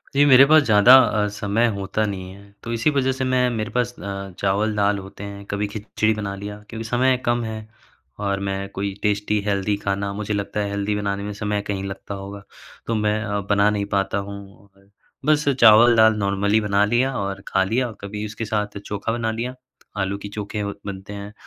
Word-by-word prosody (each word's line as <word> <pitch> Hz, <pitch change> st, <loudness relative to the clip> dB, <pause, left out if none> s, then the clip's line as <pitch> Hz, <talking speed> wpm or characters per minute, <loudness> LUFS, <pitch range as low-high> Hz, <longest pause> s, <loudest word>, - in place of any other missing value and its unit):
जी। 140 Hz, -, +5 dB
मेरे 135 Hz, -1 st, +8 dB
पास 155 Hz, +2 st, +6 dB
ज़्यादा 110 Hz, +1 st, +7 dB
अ, 105 Hz, -5 st, +3 dB
समय 105 Hz, +3 st, 0 dB
होता 100 Hz, +2 st, -1 dB
नहीं 95 Hz, -3 st, -5 dB
है 100 Hz, +1 st, -16 dB
तो 115 Hz, -, -5 dB
इसी 115 Hz, +6 st, +2 dB
वजह 135 Hz, -2 st, +1 dB
से 130 Hz, 0 st, -3 dB
मैं 130 Hz, -1 st, +2 dB
मेरे 110 Hz, -3 st, -3 dB
पास 125 Hz, 0 st, -1 dB
अ, 100 Hz, -1 st, -6 dB
चावल 105 Hz, +2 st, +1 dB
दाल 100 Hz, 0 st, +2 dB
होते 95 Hz, +1 st, -10 dB
हैं 100 Hz, 0 st, -8 dB
कभी 100 Hz, +1 st, -1 dB
खिचड़ी 110 Hz, +1 st, -1 dB
बना 105 Hz, -2 st, -4 dB
लिया 105 Hz, +1 st, -7 dB
क्योंकि 115 Hz, -1 st, -6 dB
समय 125 Hz, +2 st, +2 dB
कम 120 Hz, 0 st, +1 dB
है। 110 Hz, -1 st, -4 dB, 0.6 s
और 100 Hz, -1 st, -1 dB
मैं 100 Hz, 0 st, -3 dB
कोई 100 Hz, 0 st, -3 dB
टेस्टी 105 Hz, 0 st, +1 dB
हेल्दी 100 Hz, 0 st, 0 dB
खाना 100 Hz, 0 st, -1 dB
मुझे 105 Hz, +1 st, -3 dB
लगता 100 Hz, +1 st, -3 dB
है 100 Hz, -1 st, -1 dB
हेल्दी 100 Hz, +1 st, -1 dB
बनाने 100 Hz, -1 st, -2 dB
में 105 Hz, -, -4 dB
समय 105 Hz, 0 st, -2 dB
कहीं 100 Hz, -1 st, -2 dB
लगता 100 Hz, +1 st, -6 dB
होगा 100 Hz, +1 st, -8 dB, 0.4 s
तो 115 Hz, -, 0 dB
मैं 105 Hz, 0 st, +1 dB
अ, 105 Hz, -2 st, -2 dB
बना 100 Hz, 0 st, +4 dB
नहीं 105 Hz, -1 st, -1 dB
पाता 95 Hz, 0 st, 0 dB
हूँ। 100 Hz, 0 st, -8 dB
और 100 Hz, 0 st, -26 dB, 0.4 s
बस 150 Hz, 0 st, +2 dB
चावल 120 Hz, -2 st, +7 dB
दाल 110 Hz, 0 st, +6 dB
नॉर्मली 100 Hz, +1 st, +1 dB
बना 100 Hz, -1 st, +2 dB
लिया 120 Hz, +5 st, +1 dB
और 100 Hz, -1 st, -3 dB
खा 95 Hz, -, +2 dB
लिया 120 Hz, +6 st, 0 dB
और 110 Hz, -3 st, -10 dB
कभी 105 Hz, +1 st, -5 dB
उसके 110 Hz, +2 st, -5 dB
साथ 105 Hz, -1 st, -2 dB
चोखा 105 Hz, +2 st, -3 dB
बना 115 Hz, -1 st, -1 dB
लिया। 120 Hz, +3 st, -4 dB, 0.4 s
आलू 95 Hz, +1 st, -1 dB
की 100 Hz, 0 st, -8 dB
चोखे 105 Hz, +1 st, -5 dB
अ, 100 Hz, 0 st, -3 dB
बनते 100 Hz, 0 st, -7 dB
हैं 100 Hz, +1 st, -8 dB
105 Hz, 210 wpm, -22 LUFS, 100-110 Hz, 0.6 s, मेरे